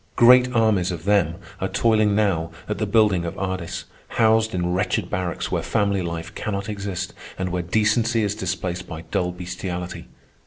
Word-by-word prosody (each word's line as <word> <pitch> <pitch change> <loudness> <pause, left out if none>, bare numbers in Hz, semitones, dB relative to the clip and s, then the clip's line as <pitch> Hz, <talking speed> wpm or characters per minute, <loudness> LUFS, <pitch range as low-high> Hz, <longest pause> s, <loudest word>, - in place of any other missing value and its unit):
Great 125 +1 +7
armies 105 -5 +3
of 85 -2 -6
them 100 -5 +3 0.2
are - - 0
toiling 110 -3 +2
now 95 -6 +1 0.2
at - - -3
the - - 0
building 105 -6 +3
of 85 - -5
Ardis, 95 -2 -3 0.3
housed 110 -2 +3
in 90 0 0
wretched 95 0 0
barracks 90 -1 -2
where - - 0
family 100 -3 +1
life 85 -1 -5
cannot 100 -2 -3
exist, 100 -2 -4 0.2
and 95 -1 -2
where 90 0 -1
decency 110 +5 +2
is 100 -1 0
displaced 90 -3 -3
by 80 -2 -6
dull 90 0 -1
bestiality. 90 0 -5
95 Hz, 165 wpm, -23 LUFS, 90-110 Hz, 0.3 s, Great